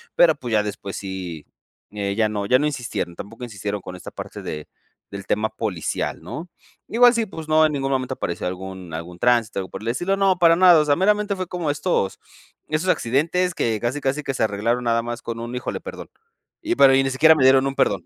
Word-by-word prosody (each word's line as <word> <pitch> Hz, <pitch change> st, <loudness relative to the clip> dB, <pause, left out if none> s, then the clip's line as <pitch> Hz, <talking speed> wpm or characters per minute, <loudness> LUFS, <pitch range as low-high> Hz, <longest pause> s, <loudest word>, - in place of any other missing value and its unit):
pero, 160 Hz, -3 st, +5 dB
pues, 125 Hz, -4 st, -7 dB
ya 105 Hz, -1 st, +3 dB
después 100 Hz, -1 st, -6 dB
sí, 95 Hz, -5 st, -6 dB, 0.5 s
eh, 100 Hz, -1 st, -3 dB
ya 110 Hz, 0 st, +2 dB
no 105 Hz, -1 st, -3 dB
ya 125 Hz, +5 st, +4 dB
no 150 Hz, -, +1 dB
insistieron, 125 Hz, -, -3 dB
tampoco 115 Hz, +7 st, -8 dB
insistieron 105 Hz, -2 st, -4 dB
con 90 Hz, -, -8 dB
esta 90 Hz, -, -9 dB
parte -, -, -8 dB
de 75 Hz, -1 st, -6 dB, 0.4 s
del 100 Hz, -1 st, -8 dB
tema 110 Hz, +1 st, 0 dB
policial, 105 Hz, -7 st, -3 dB
¿no? 170 Hz, +2 st, -7 dB, 0.4 s
Igual 245 Hz, +1 st, +5 dB
sí, 230 Hz, -2 st, 0 dB
pues 160 Hz, -5 st, -8 dB
no, 155 Hz, 0 st, +5 dB
en -, -, -4 dB
ningún 135 Hz, -1 st, -1 dB
momento 130 Hz, -1 st, -1 dB
apareció 85 Hz, -5 st, -3 dB
algún 95 Hz, -1 st, -7 dB
algún 85 Hz, +2 st, -8 dB
tránsito, 120 Hz, -4 st, +2 dB
algo 95 Hz, -, -5 dB
por -, -, -8 dB
el 115 Hz, -, -2 dB
estilo, 175 Hz, +11 st, 0 dB
no, 195 Hz, -2 st, +2 dB
para 165 Hz, -1 st, +6 dB
nada, 180 Hz, -2 st, +7 dB
o 150 Hz, -, +2 dB
sea, 145 Hz, -1 st, +3 dB
meramente 205 Hz, +3 st, +2 dB
fue 185 Hz, -1 st, -3 dB
como 175 Hz, -3 st, -3 dB
estos 145 Hz, -, -1 dB, 0.5 s
estos 155 Hz, +4 st, -1 dB
accidentes 170 Hz, +7 st, +1 dB
que 115 Hz, -8 st, -1 dB
casi 120 Hz, +6 st, -2 dB
casi 135 Hz, +3 st, -1 dB
que 135 Hz, -, -2 dB
se -, -, -4 dB
arreglaron 110 Hz, +3 st, 0 dB
nada 115 Hz, 0 st, +2 dB
más 120 Hz, 0 st, -5 dB
con 115 Hz, 0 st, -5 dB
un 120 Hz, +1 st, -6 dB
"híjole, 125 Hz, -, -4 dB
perdón". -, -, -8 dB, 0.5 s
Y 340 Hz, +2 st, 0 dB
pero 135 Hz, -, +6 dB
y 135 Hz, -, +4 dB
ni 135 Hz, -, -1 dB
siquiera 160 Hz, +5 st, +6 dB
me 145 Hz, -, +1 dB
dieron 130 Hz, +1 st, +5 dB
un 135 Hz, -, -3 dB
perdón. -, -, +1 dB
125 Hz, 225 wpm, -22 LUFS, 105-155 Hz, 0.5 s, nada